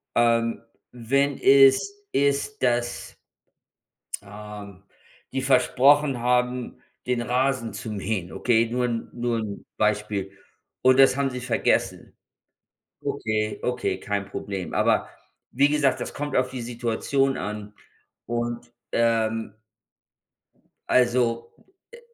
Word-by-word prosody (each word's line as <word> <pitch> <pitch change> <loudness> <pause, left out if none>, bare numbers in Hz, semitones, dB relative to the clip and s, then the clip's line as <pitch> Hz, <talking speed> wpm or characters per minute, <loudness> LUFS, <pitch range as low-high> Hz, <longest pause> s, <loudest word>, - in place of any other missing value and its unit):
Ähm, 115 -1 +2 0.3
wenn 140 +4 0
es 135 +8 +5 0.2
ist, 140 +9 0
dass 120 -1 -1 1.0
ähm, 105 -1 -10 0.5
die 135 - -2
versprochen 135 +1 +4
haben, 125 +1 0 0.3
den 125 -1 0
Rasen 125 -2 0
zu 110 +2 -6
mähen, 100 -3 -3
okay, 115 -2 +2
nur 125 +1 0
'n 115 -2 -3
nur 120 -1 -1
'n 105 -2 -6
Beispiel. 105 -2 0 0.5
Und 130 0 +5
das 135 0 +6
haben 140 -1 +1
Sie 125 -1 -6
vergessen. 125 -1 0 0.9
Okay, 110 -1 -2
okay, 125 0 -1
kein 100 -1 -2
Problem. 95 -2 -5
Aber - - +2 0.4
wie 140 +3 +4
gesagt, 145 -2 +2
das - - -5
kommt 145 -1 -4
auf 125 0 +2
die 130 -2 -5
Situation 120 +3 -1
an 105 +1 -5 0.5
und, 120 +1 -3 0.2
ähm 115 -2 +1 1.3
also, 120 -2 +2 0.4
äh 475 - -11
120 Hz, 110 wpm, -25 LUFS, 110-130 Hz, 1.3 s, das